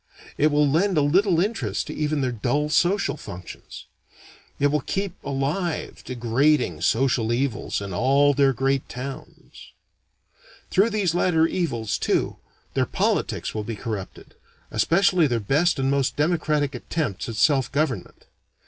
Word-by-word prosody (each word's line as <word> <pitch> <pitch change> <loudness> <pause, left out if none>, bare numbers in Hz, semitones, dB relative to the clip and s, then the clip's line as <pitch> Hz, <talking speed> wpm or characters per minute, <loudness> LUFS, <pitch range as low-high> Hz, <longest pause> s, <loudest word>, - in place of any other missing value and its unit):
It 150 - +3
will 145 0 +3
lend 175 +6 +2
a 150 - +4
little 175 +4 +3
interest 145 - -1
to - - -6
even 150 -1 -1
their 130 -1 0
dull 135 +6 -1
social 175 +2 +1
functions. 90 -7 -10 0.7
It 145 0 +3
will 150 -1 +1
keep 195 +5 -3
alive 145 +6 -3
degrading 130 +5 +1
social 120 -2 +1
evils 120 -4 -1
in 100 -2 -5
all 140 +7 +3
their 140 -1 +3
great 135 +2 -1
towns. 135 +2 -9 1.0
Through 200 +5 +4
these 205 -6 0
latter 170 -2 +3
evils, 135 - -2
too, - - 0 0.4
their - - +1
politics - - -1
will 110 - -3
be 115 +1 -5
corrupted; 105 -2 -7 0.4
especially 175 -1 +3
their 120 -3 0
best 150 - +1
and 135 0 0
most 140 -2 0
democratic 150 -2 0
attempts 125 - -3
at 115 - -5
self 135 +2 +2
government. 155 +3 -2
140 Hz, 140 wpm, -24 LUFS, 125-160 Hz, 1.0 s, a